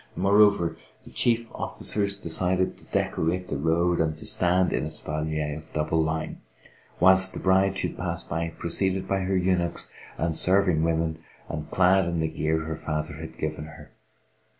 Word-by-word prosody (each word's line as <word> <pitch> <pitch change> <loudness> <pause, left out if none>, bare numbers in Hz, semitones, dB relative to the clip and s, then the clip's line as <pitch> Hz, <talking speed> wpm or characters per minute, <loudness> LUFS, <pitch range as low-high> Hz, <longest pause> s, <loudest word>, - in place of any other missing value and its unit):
More 100 +2 +3
over, 90 -6 +4 0.3
the - - -13
chief 115 -1 0
officers 100 -1 -1
decided 90 +2 0
to - - -16
decorate 90 +3 -1
the - - -2
road 85 +3 +2
and 80 -1 -1
to - - -8
stand 90 +1 +2
in - - 0
espalier 75 -1 -3
of 80 0 -11
double 75 +1 +1
line, 80 0 -3 0.6
whilst 95 +1 +4
the - - -4
bride 95 +1 +2
should - - -3
pass - - -3
by 85 +2 -3
preceded 95 +3 -1
by 95 - 0
her 95 0 0
eunuchs 90 -2 0 0.3
and 85 -1 -1
serving 90 -2 +5
women 80 -1 0 0.3
and 75 - -5
clad 95 +1 +4
in 85 -1 -1
the 80 - +1
gear 80 0 -1
her 80 0 -4
father 75 -1 -4
had 80 0 -9
given 75 -1 -4
her. 75 -1 -13
85 Hz, 170 wpm, -26 LUFS, 80-95 Hz, 0.6 s, serving